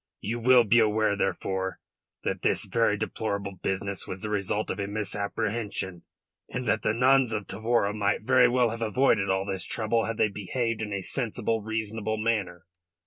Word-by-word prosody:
You 115 +4 -3
will 125 +1 +6
be 115 +2 +4
aware, 110 -1 +2
therefore, 95 -2 -2 0.4
that - - -2
this - - +2
very 115 -3 +1
deplorable 100 -2 -3
business 95 0 -2
was 95 - -6
the 105 - -4
result 105 +1 -1
of - - -5
a 100 - -2
misapprehension, 100 -2 -2 0.5
and 125 0 -4
that 110 - +2
the 110 - 0
nuns 130 -1 +4
of 105 -2 -2
Tavora 110 0 0
might 105 0 0
very 130 - +5
well 125 -1 +3
have 115 +1 -6
avoided 110 -3 +2
all 95 0 +1
this 95 -2 -2
trouble 115 0 0
had 115 -1 -3
they 110 - +3
behaved 110 +3 -2
in 105 -1 -4
a 100 -1 -3
sensible, 115 -2 -1
reasonable 110 0 -3
manner. 105 -6 -1
110 Hz, 175 wpm, -27 LUFS, 100-115 Hz, 0.5 s, will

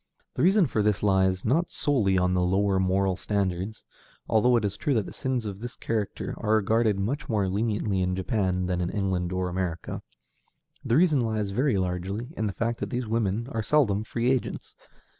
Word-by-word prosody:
The - - -3
reason 190 +2 +5
for 115 -6 0
this 105 -1 +1
lies, 95 -2 +2
not 160 +9 +2
solely 115 -10 +1
in 90 0 +2
the 90 - +2
lower 95 +2 +2
moral 95 0 +1
standards 100 +1 -2 0.4
although 120 +3 +4
it 115 -3 +2
is 100 0 -2
true 145 - 0
that 110 -4 -1
sins 130 -3 -2
of 100 -2 -5
this 120 +1 -6
character 110 -3 -3
are 110 +1 +2
regarded 110 0 +2
much 125 +9 -2
more 105 -4 +1
leniently 105 -1 0
in 90 0 0
Japan 95 -2 0
than 90 -1 -1
in 90 - -1
England 95 -4 -1
or 90 0 -1
America. 90 -2 -3 0.8
The 120 - +2
reason 155 -6 +4
lies 110 -3 -1
very 125 +1 +1
largely 95 - -3
in 110 - -1
the 100 - -3
fact 115 +2 -2
that - - -3
these 125 -2 -3
women 110 0 0
are 115 - -1
seldom 110 -6 +2
free 120 +2 0
agents. 130 -2 -2
105 Hz, 190 wpm, -26 LUFS, 95-115 Hz, 0.8 s, reason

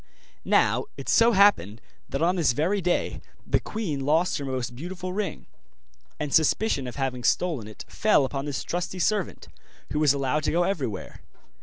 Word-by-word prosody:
Now - - +3
it - - -8
so 230 0 +5
happened 195 - +4 0.3
that 140 +3 -2
on 180 +2 +2
this 160 -9 +2
very 180 +10 0
day 175 0 -1 0.2
the - - +1
queen 185 -11 -4
lost 155 +6 +1
her 140 - -5
most 130 -3 -3
beautiful 180 +5 -6
ring, 195 -5 -4 0.7
and 145 - -3
suspicion 160 - +2
of 125 - -7
having 130 -3 -3
stolen 145 -4 0
it 110 - -10
fell 210 -10 +3
upon 135 +1 -4
this 145 -2 -3
trusty 180 +1 -3
servant, 200 +1 -1 0.5
who 150 - 0
was 150 -3 +5
allowed 140 +2 0
to - - +1
go 175 +2 +2
everywhere. 140 - -3
155 Hz, 170 wpm, -26 LUFS, 135-185 Hz, 0.7 s, so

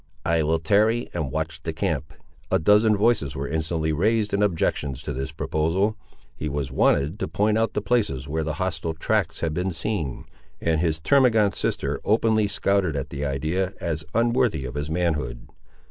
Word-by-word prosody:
"I 85 -1 +2
will 80 +2 +2
tarry 105 +8 +2
and 75 -6 -2
watch 80 +2 -3
the 80 - -4
camp." 80 -4 -2 0.3
A - - +3
dozen 105 +5 +4
voices 100 - +1
were 70 +1 -3
instantly 80 +1 -1
raised 105 +6 +1
in 100 - +2
objections 75 -7 0
to 75 - -4
this 70 +4 -4
proposal. 85 +7 0 0.4
He 75 - -4
was 70 -2 -3
wanted 70 +7 +2
to - - -2
point 105 +1 +1
out 115 -1 0
the 105 - -2
places 100 - 0
where 80 +2 -1
the 80 -1 -3
hostile 85 -2 -2
tracks 80 - 0
had 80 -2 -1
been 90 +4 -1
seen, 85 - -3 0.3
and 80 -1 +1
his 80 -2 0
termagant 110 - +4
sister - - -2
openly 110 0 +2
scouted 100 -5 +1
at 70 -1 -4
the 70 0 -4
idea, 80 +7 -1
as 80 -2 -2
unworthy 115 - +2
of 65 - -6
his 75 +1 -3
manhood. 80 -7 -1
80 Hz, 175 wpm, -24 LUFS, 75-105 Hz, 0.4 s, dozen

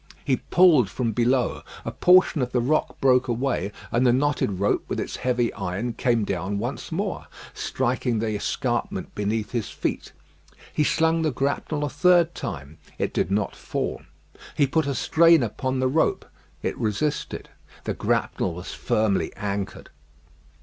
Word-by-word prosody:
He 130 -3 +2
pulled 160 - +4
from 120 0 -1
below. 120 +3 +1 0.2
A - - -2
portion 180 -4 +4
of 125 0 -2
the 125 - +3
rock 140 +6 0
broke 130 -1 +4
away, 120 -3 -1 0.2
and 120 - +2
the 125 - +5
knotted 130 -7 0
rope 100 - +1
with - - -3
its - - -4
heavy 120 -2 0
iron 100 +5 -3
came 120 -1 +1
down 100 +2 -2
once 120 +10 -4
more, 195 +5 -3 0.3
striking 125 -2 -1
the 110 0 -1
escarpment 105 - -2
beneath 105 +1 -2
his 115 -4 -2
feet. - - -3 0.6
He 150 - +2
slung 160 +2 +2
the 160 - +2
grapnel 140 +3 -1
a - - -2
third 175 +3 +4
time. 70 +4 -7 0.2
It - - -2
did - - 0
not 100 +1 -1
fall. - - -3 0.6
He 145 - +5
put 155 +2 0
a 140 - -1
strain 165 -1 +5
upon 130 +4 -2
the 130 - +2
rope; 155 +5 +1 0.4
it - - -1
resisted. 115 +8 -2 0.3
The - - -2
grapnel 85 - -1
was 90 +2 -7
firmly 110 -3 0
anchored. 100 -1 -4
125 Hz, 155 wpm, -24 LUFS, 105-145 Hz, 0.6 s, the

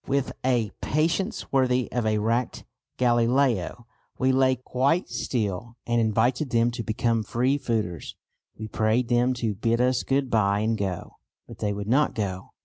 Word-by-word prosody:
With 140 -1 0
a 120 -5 +1
patience 170 +8 -1
worthy 130 -2 +2
of 120 -2 -1
a 110 0 +2
racked 115 +4 -1 0.3
Galileo 120 -2 +1 0.3
we 130 0 +2
lay 130 0 +3
quite 130 +7 0
still 110 0 -3
and 120 0 +1
invited 120 +6 +1
them 115 0 +2
to 120 - -4
become 115 +1 0
"free 125 +6 0
fooders." 110 -10 -3 0.4
We 110 - -6
prayed 110 +3 0
them 125 +1 +2
to 115 -3 -1
"bid 115 +4 0
us 125 0 +2
good 135 -1 0
bye 100 -2 +2
and 110 +1 +1
go." 95 -4 -4 0.3
But - - -12
they 105 - -1
would 100 0 -4
not 135 +6 +2
go. 95 -4 -3
120 Hz, 160 wpm, -25 LUFS, 110-130 Hz, 0.4 s, lay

